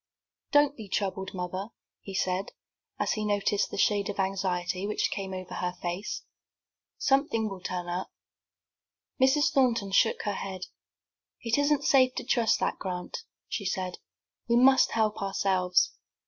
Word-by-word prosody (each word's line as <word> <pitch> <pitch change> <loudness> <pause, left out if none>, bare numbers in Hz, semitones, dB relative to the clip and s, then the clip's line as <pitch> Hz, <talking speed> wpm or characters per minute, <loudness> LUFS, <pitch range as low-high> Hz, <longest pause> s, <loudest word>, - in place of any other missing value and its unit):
"Don't 290 0 +4
be 220 -6 -9
troubled, 190 -1 -2
mother," 185 +2 -3 0.3
he 195 - -8
said, 185 +1 -1 0.5
as - - +1
he 215 - -1
noticed 205 -1 +1
the - - -6
shade 205 0 +2
of 205 - -5
anxiety 190 -1 -1
which 210 - 0
came 195 -2 -4
over 185 -1 -6
her 180 0 -2
face. 175 +4 -4 0.7
"Something 270 -5 +2
will 195 -3 -7
turn 180 -1 -4
up." 175 +2 -3 1.1
Mrs. 265 +3 +4
Thornton 230 -7 +2
shook 190 - +3
her 205 - -1
head. 190 -1 -5 0.8
"It 235 +3 +1
isn't 285 0 +2
safe 255 -2 +5
to - - -3
trust 235 -3 +3
to - - 0
that, - - -2
Grant," 180 - -4 0.3
she 205 - -3
said; 185 -1 -3 0.5
"we 235 - +4
must 265 +2 +5
help 215 -2 +1
ourselves." 190 -2 +2
200 Hz, 150 wpm, -28 LUFS, 185-230 Hz, 1.1 s, safe